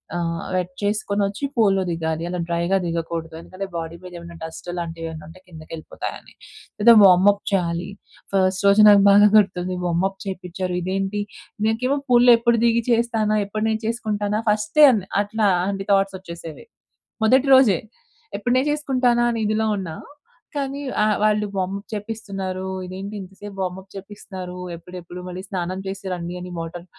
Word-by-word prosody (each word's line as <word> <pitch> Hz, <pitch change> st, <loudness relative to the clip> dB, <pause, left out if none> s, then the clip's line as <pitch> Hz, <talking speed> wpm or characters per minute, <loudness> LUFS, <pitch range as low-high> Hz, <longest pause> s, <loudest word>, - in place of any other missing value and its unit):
ఆహ్, 170 Hz, -1 st, -2 dB
వెట్ 180 Hz, 0 st, -1 dB
చేసుకొని 205 Hz, 0 st, -1 dB
వచ్చి 200 Hz, +8 st, -3 dB
పూల్‌లో 195 Hz, -4 st, +3 dB
దిగాలి. 160 Hz, -1 st, -2 dB
అలా 180 Hz, 0 st, -3 dB
డ్రైగా 170 Hz, +3 st, +1 dB
దిగకూడదు. 165 Hz, -1 st, -4 dB
ఎందుకంటే 190 Hz, +3 st, -7 dB
బాడీ 165 Hz, 0 st, -4 dB
మీద 180 Hz, -, -9 dB
ఏమన్నా 170 Hz, 0 st, -11 dB
డస్ట్ 160 Hz, +2 st, -8 dB
అలాంటివి 165 Hz, -1 st, -5 dB
ఏమైనా 155 Hz, -1 st, -9 dB
ఉంటే 175 Hz, +3 st, -14 dB
కిందకి 160 Hz, -3 st, -13 dB
వెళ్ళిపోతాయని. 155 Hz, -, -7 dB, 0.5 s
ఏదో 235 Hz, 0 st, +9 dB
వార్మప్ 195 Hz, +2 st, +6 dB
చేయాలి. 175 Hz, -1 st, -1 dB, 0.4 s
ఫస్ట్ 190 Hz, 0 st, +1 dB
రోజు 205 Hz, +2 st, +6 dB
నాకు 200 Hz, -1 st, +7 dB
బాగా 205 Hz, +1 st, +7 dB
గుర్తుంది 185 Hz, -2 st, +1 dB
వార్మప్ 190 Hz, +3 st, 0 dB
చేపించారు. 185 Hz, -1 st, -4 dB
ఇదేంటి? 195 Hz, +3 st, -2 dB, 0.5 s
నేకేమో 250 Hz, +5 st, 0 dB
పూల్‌లో 245 Hz, 0 st, +7 dB
ఎప్పుడు 235 Hz, -1 st, +2 dB
దిగి 235 Hz, 0 st, +2 dB
చేస్తానా? 225 Hz, -2 st, +1 dB
ఎప్పుడు 215 Hz, +2 st, -2 dB
నేర్చేసుకుంటానా? 220 Hz, -2 st, -1 dB
ఫస్టే 215 Hz, +9 st, +4 dB
అన్నీ, 195 Hz, -3 st, -2 dB, 0.2 s
అట్లా 215 Hz, +1 st, 0 dB, 0.2 s
అన్ని 195 Hz, 0 st, -4 dB
థాట్స్ 195 Hz, -1 st, +1 dB
వచ్చేసేవి. 170 Hz, -3 st, -10 dB, 0.6 s
మొదటి 260 Hz, +4 st, +4 dB
రోజే. 220 Hz, -10 st, +5 dB, 0.6 s
ఎప్పుడు 245 Hz, +4 st, 0 dB
నేర్చేసుకుంటానా 260 Hz, -4 st, +1 dB
అన్న 225 Hz, -2 st, -1 dB
ఇదిలో 220 Hz, +1 st, 0 dB
ఉన్నా. 165 Hz, -5 st, -5 dB, 0.6 s
కానీ 280 Hz, 0 st, -3 dB, 0.2 s
ఆహ్, 215 Hz, 0 st, +3 dB
వాళ్ళు 210 Hz, 0 st, +2 dB
వార్మప్ 195 Hz, +2 st, -3 dB
చేపిస్తున్నారు. 195 Hz, -3 st, -5 dB, 0.2 s
ఇదేంటి 190 Hz, +3 st, -7 dB
ఇంతసేపు 195 Hz, +1 st, -10 dB
వార్మప్ 185 Hz, +1 st, -4 dB
చేపిస్తున్నారు? 190 Hz, -2 st, -8 dB, 0.2 s
ఎప్పుడెప్పుడు, 175 Hz, +1 st, -10 dB
మళ్ళీ 180 Hz, +1 st, -6 dB
స్నానం 185 Hz, 0 st, -3 dB
చేసి 195 Hz, 0 st, -6 dB
రండి 175 Hz, 0 st, -5 dB
అని 180 Hz, 0 st, -8 dB
వాటర్ 170 Hz, +1 st, -6 dB
195 Hz, 145 wpm, -22 LUFS, 180-215 Hz, 0.6 s, ఏదో